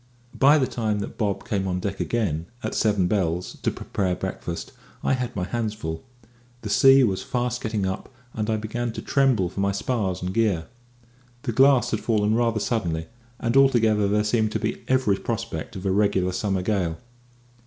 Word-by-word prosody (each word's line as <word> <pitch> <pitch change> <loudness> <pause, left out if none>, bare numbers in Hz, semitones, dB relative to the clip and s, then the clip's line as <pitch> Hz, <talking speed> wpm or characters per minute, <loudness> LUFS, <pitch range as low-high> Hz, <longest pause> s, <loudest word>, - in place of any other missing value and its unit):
By 145 +3 +5
the 135 - +2
time 110 -4 -1
that - - -7
Bob 100 -3 -1
came 95 -2 -1
on 90 -1 -1
deck 100 +1 -4
again, 85 -9 -1 0.2
at - - -2
seven 105 -4 +2
bells, 90 -3 -1
to - - +1
prepare 95 -3 -2
breakfast, 90 -2 -5 0.3
I - - +2
had 125 -2 -2
my 90 - -1
hands 110 +2 -2
full. 80 -5 -5 0.6
The 105 - -3
sea 135 +5 +7
was 95 -6 +1
fast 125 -1 -2
getting 110 -3 -1
up, 95 0 -4 0.2
and 110 0 -2
I 110 - +1
began 115 +3 -3
to - - -5
tremble 130 -9 +2
for 95 - -7
my 100 0 +2
spars 100 -3 -2
and 90 +1 -2
gear. 100 -8 +1 0.8
The 130 - -1
glass 135 +2 +4
had 110 - 0
fallen 110 -2 +1
rather 115 -1 +1
suddenly, 85 -8 -2 0.3
and 115 +1 -1
altogether 115 -6 +4
there 105 +1 +2
seemed 110 0 +1
to - - 0
be - - -3
every 130 -7 +2
prospect 115 -8 -4
of 95 0 -7
a 95 - +2
regular 100 -2 +2
summer 95 0 -1
gale. 90 -5 0
105 Hz, 185 wpm, -24 LUFS, 95-115 Hz, 0.8 s, sea